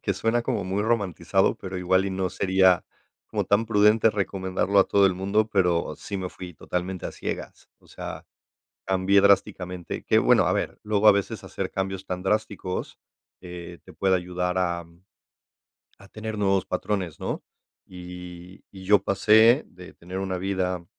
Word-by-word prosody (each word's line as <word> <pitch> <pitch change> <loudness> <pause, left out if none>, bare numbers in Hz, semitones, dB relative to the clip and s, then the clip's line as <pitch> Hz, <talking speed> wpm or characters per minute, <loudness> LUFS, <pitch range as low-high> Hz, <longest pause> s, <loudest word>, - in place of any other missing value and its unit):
que 100 - 0
suena 115 +5 0
como 115 -6 -1
muy 95 +2 -1
romantizado, 95 -4 +1
pero 95 -1 -6
igual 95 +1 +2
y 100 - -2
no 95 -1 -1
sería 95 -1 +3 0.5
como - - -1
tan 100 +3 +2
prudente 105 +1 +4
recomendarlo 100 -1 -1
a 95 - +7
todo 100 -1 +4
el 95 - +1
mundo, 100 +4 0
pero 90 -4 +1
sí 100 - -6
me 90 -1 -4
fui 90 -1 -10
totalmente 90 +2 -4
a - - -7
ciegas. - - -6
O - - -25
sea, - - -8 0.6
cambié 95 +1 +3
drásticamente, 95 -3 0
que - - +3
bueno, - - +4
a - - +2
ver, - - -3
luego 105 0 +1
a - - +9
veces 100 -1 -3
hacer - - -4
cambios 95 0 -4
tan 90 0 -4
drásticos, 100 -2 -2 0.4
eh, 90 -1 -9
te - - -14
puede 95 -1 +2
ayudar, 90 0 -3
am, 85 0 -3 0.9
a 100 0 -16
tener 110 0 -6
nuevos 100 -2 +1
patrones, 90 -3 -3
¿no? - - -4 0.4
Y 90 0 -10
y 95 -1 -12
yo 100 -1 +4
pasé 110 +7 +5
de 90 0 -14
tener 90 +2 -7
una 95 -1 -2
vida 90 -2 -2
95 Hz, 165 wpm, -25 LUFS, 90-100 Hz, 0.9 s, a